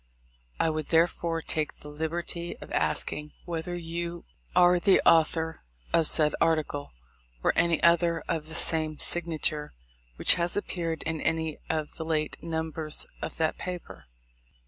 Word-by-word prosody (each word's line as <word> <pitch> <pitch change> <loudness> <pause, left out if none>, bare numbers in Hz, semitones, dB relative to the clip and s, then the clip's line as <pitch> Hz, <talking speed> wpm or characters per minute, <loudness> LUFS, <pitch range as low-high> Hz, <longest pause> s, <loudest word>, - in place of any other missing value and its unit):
I 160 - +2
would 155 -1 -3
therefore 165 0 +1
take 155 -1 -2
the - - -12
liberty 170 +3 -4
of - - -11
asking 150 0 0
whether 175 0 -3
you 170 0 -5 0.3
are 180 0 +6
the 195 +2 +5
author 160 0 +3 0.3
of 165 -2 +5
said 150 -2 +3
article, 155 -3 0 0.5
or - - +3
any 170 -2 +2
other 170 -1 +4
of 160 -2 -2
the 160 - -6
same 155 -2 +2
signature 155 -3 0 0.4
which - - +5
has 175 +3 0
appeared 170 -5 -3
in 160 -1 -3
any 160 -1 0
of 155 -2 -2
the 160 - -3
late 155 -1 -2
numbers 160 -1 -1 0.2
of - - -5
that 160 -1 0
paper. 180 -1 -7
160 Hz, 145 wpm, -28 LUFS, 155-170 Hz, 0.5 s, are